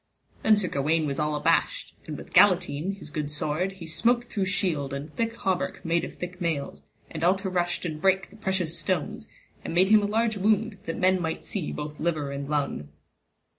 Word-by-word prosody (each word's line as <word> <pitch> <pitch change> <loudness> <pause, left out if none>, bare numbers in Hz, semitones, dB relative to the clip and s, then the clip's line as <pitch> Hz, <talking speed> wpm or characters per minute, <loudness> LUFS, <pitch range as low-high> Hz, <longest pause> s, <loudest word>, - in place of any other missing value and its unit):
Then 220 - +6
Sir 205 -3 0
Gawaine 155 +3 +1
was 140 0 -2
all 150 0 0
abashed, 160 +3 +1
and 150 -2 -5
with - - -11
Galatine 180 -2 +4
his 155 -6 -11
good 150 -2 -3
sword 155 +5 -1
he 190 -3 -10
smote 240 +9 +2
through 205 -5 -2
shield 165 -8 0
and 145 +3 -7
thick 230 0 -1
hauberk 190 -5 -2
made 165 0 +2
of - - -7
thick 180 +1 -6
mails, 160 -5 -2 0.3
and 160 0 -5
all 180 +3 +5
to 190 -1 -4
rushed 175 0 0
and 155 -2 -4
break 190 0 +2
the - - -15
precious 190 -5 -1
stones, 180 -6 -2 0.4
and - - -4
made 185 +2 +5
him 215 0 +7
a 205 - 0
large 220 +1 +1
wound, 210 +1 +1
that 165 - -2
men 185 0 +3
might 160 -1 -3
see 190 -7 -3
both 150 0 -6
liver 155 -4 -1
and 140 0 -5
lung. 140 - -1
175 Hz, 205 wpm, -27 LUFS, 150-195 Hz, 0.4 s, him